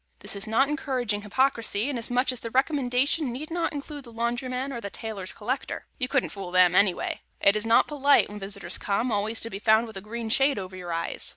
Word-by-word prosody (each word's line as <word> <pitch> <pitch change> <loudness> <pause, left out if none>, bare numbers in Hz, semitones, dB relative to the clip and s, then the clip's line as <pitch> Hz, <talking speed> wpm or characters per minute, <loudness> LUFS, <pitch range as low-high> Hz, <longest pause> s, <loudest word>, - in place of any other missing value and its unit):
This - - -4
is 200 +1 -3
not 230 +6 +3
encouraging 255 -7 -1
hypocrisy, 230 0 +1
inasmuch 250 -1 +1
as 250 - -6
the 230 - -6
recommendation 265 +1 +1
need 295 +7 -6
not 340 0 0
include 290 -1 -6
the 235 - -12
laundryman 250 +3 -2
or 235 - -5
the 200 - -5
tailor's 200 -3 -6
collector. 255 +6 -4
You 250 - +1
couldn't 275 -1 +1
fool 195 -3 -6
them, 180 -1 +5
anyway. 190 -1 +2 0.2
It 200 - +5
is 215 +1 -1
not 230 - +6
polite, 285 -1 +4
when 210 0 -8
visitors 195 -2 -4
come, 220 +5 0
always 215 +2 0
to 230 - -4
be 195 - -5
found 220 +1 +4
with 220 -3 -9
a - - -5
green 225 +2 -5
shade 275 +3 +3
over 185 -1 -6
your 180 -2 -6
eyes. 165 0 -2
230 Hz, 215 wpm, -26 LUFS, 205-265 Hz, 0.2 s, not